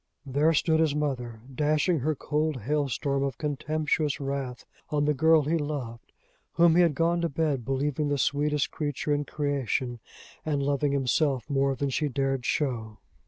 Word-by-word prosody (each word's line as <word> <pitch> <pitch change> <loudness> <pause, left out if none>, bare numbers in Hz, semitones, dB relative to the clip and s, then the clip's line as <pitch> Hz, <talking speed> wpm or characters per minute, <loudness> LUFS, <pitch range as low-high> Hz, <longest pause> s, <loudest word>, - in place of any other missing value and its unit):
There 145 +4 +2
stood 160 0 +2
his 155 -3 +2
mother, 125 -6 -3
dashing 155 +4 +1
her 155 +4 0
cold 150 -1 -1
hailstorm 140 +1 -1
of 135 -3 -2
contemptuous 150 0 -1
wrath 135 -3 -4 0.2
on 145 -1 +1
the 150 - +3
girl 160 +2 +4
he 160 +4 0
loved, 135 -6 -5 0.4
whom 170 -1 +5
he 180 - +6
had 165 -5 +3
gone 170 +3 +1
to 170 - 0
bed 145 -4 -1
believing 140 +3 -1
the 145 0 0
sweetest 145 +2 +1
creature 145 -1 -2
in 145 0 0
creation, 135 -4 -2 0.4
and 145 -3 -1
loving 140 0 +1
himself 135 0 +1
more 135 -1 +1
than 140 +1 -2
she 150 +3 0
dared 135 -1 -1
show! 115 -7 -1
145 Hz, 165 wpm, -27 LUFS, 135-155 Hz, 0.4 s, he